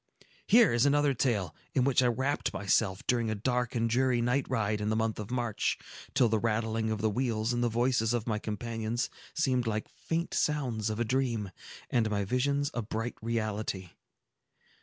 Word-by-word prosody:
Here 230 - +6
is 120 +3 +4
another 145 0 +3
tale, 110 - 0 0.2
in 130 - +4
which 130 -1 +3
I 125 - +3
wrapt 130 +5 0
myself 95 -1 +1
during 120 -2 +1
a 110 - -1
dark 125 +3 -1
and 115 -1 +2
dreary 125 +1 +2
night 125 +3 +1
ride 110 -4 0
in 105 - -1
the 110 - +1
month 110 -1 0
of 105 - -5
March, 120 -4 -1 0.4
till 125 - +5
the 110 -1 +1
rattling 110 0 0
of 110 -1 -2
the 110 - +2
wheels 115 -1 0
and 120 0 0
the 120 - +2
voices 120 -1 +1
of 120 -2 -1
my 110 -2 -1
companions 115 +2 -3 0.2
seemed 130 -6 +1
like 110 -1 -2
faint 165 +1 -3
sounds 125 -8 0
of 110 +1 -3
a 120 - +1
dream, 115 -5 0 0.4
and 115 -2 +2
my 100 -1 0
visions 140 +6 0
a 120 - -1
bright 115 +2 -3
reality. 110 -5 -2
115 Hz, 185 wpm, -30 LUFS, 110-125 Hz, 0.4 s, Here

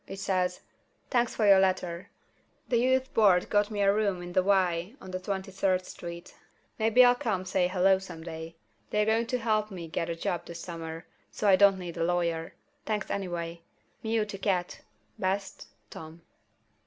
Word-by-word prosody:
It 195 - -7
says: 180 -2 -1 0.5
"Thanks 240 -2 +1
for 220 - +1
your 195 -1 +7
letter. 185 -2 0 0.6
The 240 - +2
Youth 260 +1 +1
Board 195 -5 +4
got 205 -1 +3
me 210 -2 -2
a 200 0 +4
room 200 -4 0
in 175 0 -8
the 185 - +4
Y 185 +1 +1
on 185 - -10
Twenty 190 +1 -4
third 185 -1 0
Street. 170 0 -9 0.5
Maybe 225 +3 +6
I'll 245 - +6
come 210 -7 -2
say 185 -1 +1
Hello 190 +1 +3
some 165 -4 -9
day. 160 0 -7 0.3
They're 210 0 +1
going 225 +2 +1
to 250 - 0
help 215 -2 0
me 175 -4 -7
get 165 +1 -3
a 170 - -2
job 170 +1 -3
this 170 0 -8
summer, 165 -1 -7 0.2
so 210 - -2
I 195 - +7
don't 200 0 +5
need 175 -3 -7
a - - 0
lawyer. 170 -1 -1 0.3
Thanks 210 -2 -2
anyway. 170 -3 -4 0.4
Meow 225 -1 0
to 200 -2 -7
Cat. 185 -3 -1 0.4
Best, 195 +1 -2 0.2
Tom." 160 +1 -10
190 Hz, 180 wpm, -28 LUFS, 175-210 Hz, 0.6 s, your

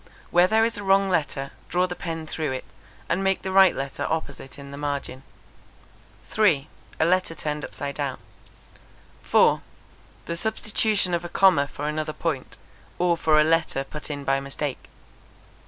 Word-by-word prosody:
Where 175 +1 +5
there 220 +3 +4
is 230 -2 -2
a - - -6
wrong 195 0 +3
letter, 145 -5 -1 0.2
draw 180 +1 +2
the 180 -1 -5
pen 165 -2 -5
through 155 -3 -3
it, 130 - -5 0.4
and 185 +3 0
make 195 0 +1
the 190 - -3
right 190 -1 +6
letter 135 0 -3
opposite 145 -4 -4
in 140 -1 -10
the - - -7
margin. 140 -2 -3 1.1
3. 170 - +3 0.3
A 160 - +4
letter 185 -1 +1
turned 150 -1 -3
upside 140 -1 -5
down. 140 -3 -3 1.0
4. - - +4 0.6
The 170 - -3
substitution 215 -1 0
of 170 0 0
a 175 - -6
comma 175 -7 +4
for 145 +1 -5
another 155 0 -2
point, 155 -6 -3 0.4
or 175 -1 +2
for 155 -2 +3
a - - +6
letter 160 -3 +1
put 150 +3 -8
in 145 -1 -4
by 135 0 +1
mistake. 140 0 -5
160 Hz, 165 wpm, -25 LUFS, 140-185 Hz, 1.1 s, right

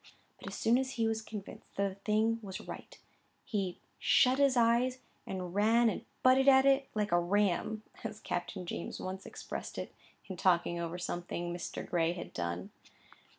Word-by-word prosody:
But - - -10
as - - -5
soon 235 +3 +3
as 265 0 -2
he 225 -1 +1
was 220 0 0
convinced 210 -3 -9
that 200 0 +1
a - - -9
thing 215 +3 +1
was 190 -3 -6
right, - - -9 0.5
he 195 -7 -2 0.2
"shut 255 +1 +4
his 275 -3 +4
eyes 240 +2 +3 0.3
and 180 -2 -4
ran 225 +3 +4
and - - -6 0.2
butted 260 +1 +5
at 265 0 +7
it 275 0 +4
like 210 -1 0
a 175 - +5
ram," 205 +3 +1 0.2
as 215 -1 -5
Captain 180 +1 -4
James 170 - -5
once 190 +1 -5
expressed - - -6
it, - - -5 0.3
in 190 - -6
talking 175 -1 +2
over 170 +1 -3
something 175 0 -3
Mr. 175 -1 -5
Gray 170 -1 +1
had 175 - -8
done. 85 +1 -3
205 Hz, 175 wpm, -32 LUFS, 175-235 Hz, 0.5 s, at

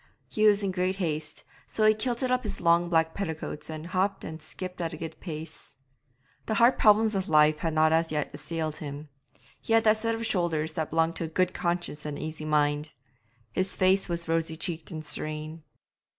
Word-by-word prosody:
He 215 0 +2
was 205 -1 +4
in 195 - 0
great 185 +1 0
haste, 155 -5 -3 0.2
so 215 - +1
he 215 - +7
kilted 245 +3 -1
up 255 0 +2
his 200 -3 -5
long 170 0 +3
black 160 -1 +2
petticoats 160 -5 -5
and 155 0 -6
hopped 190 +2 0
and 160 0 -7
skipped 180 +3 -7
at 165 0 -2
a - - -6
good 160 +1 -7
pace. 160 -2 -8 0.7
The 220 - 0
hard 235 +3 +5
problems 215 +1 +5
of 195 -1 -2
life 150 0 +5
had 165 -2 -2
not 155 0 +4
as 165 0 +2
yet 150 -2 -2
assailed 155 +1 -4
him; 145 0 -7 0.5
he 225 - -1
had 225 0 +5
that 215 -1 +5
set 230 +1 -1
of 225 - -5
the - - -1
shoulders 165 -6 0
that 155 -1 -2
belongs 165 +1 +1
to 165 - -2
a - - -4
good 180 +3 +1
conscience 170 -3 -2
and 150 -1 -4
an - - -5
easy 155 0 -5
mind; 150 0 +1 0.6
his 190 +7 -1
face 190 0 +3
was 170 -1 -3
rosy 165 0 0
cheeked 165 -1 -3
and 155 -2 -6
serene. 155 +1 -2
165 Hz, 210 wpm, -28 LUFS, 155-195 Hz, 0.7 s, he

